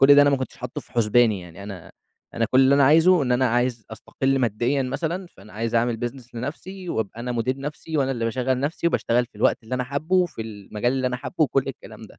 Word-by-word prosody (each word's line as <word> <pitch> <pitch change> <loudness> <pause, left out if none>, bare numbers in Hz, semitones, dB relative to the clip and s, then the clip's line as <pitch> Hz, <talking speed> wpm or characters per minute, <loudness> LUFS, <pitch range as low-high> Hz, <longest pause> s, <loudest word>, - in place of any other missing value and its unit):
كُلّ 140 +1 +8
ده 145 - +8
أنا 145 - +4
ما 140 - +3
كنتش 130 -1 -5
حاطه 125 0 -6
في - - -21
حُسباني 115 -2 +3
يعني 90 +1 -11
أنا 100 -4 -9 0.4
أنا 115 - +1
كُلّ 130 - +5
اللي 135 +1 +5
أنا 140 - +5
عايزه 165 +4 +5
إن 125 -2 +1
أنا 125 +1 +3
عايز 120 -2 0
أستقلّ 135 +4 -1
ماديًا 120 +3 +1
مثلًا، 165 +8 -3
فأنا 105 - -17
عايز 115 +2 -3
أعمل 115 0 +1
business 125 -1 -15
لنَفْسي، 175 +10 -6
وأبقى 110 - -3
أنا 125 +1 -3
مدير 120 +2 -1
نَفْسي، 150 +3 -5
وأنا 135 -1 +1
اللي 115 -3 -2
باشغّل 125 +2 0
نَفْسي، 155 +4 -1
وباشتغل 120 -7 +1
في 125 - -42
الوقت - - +2
اللي 120 +3 -4
أنا 125 - -1
حابه، 140 +7 -2
وفي 175 -11 0
المجال 110 +2 -3
اللي 130 -1 0
أنا 125 - -3
حابه 125 - -8
وكُلّ 135 -2 0
الكلام 135 - -9
ده - - -14
125 Hz, 235 wpm, -24 LUFS, 115-140 Hz, 0.4 s, كُلّ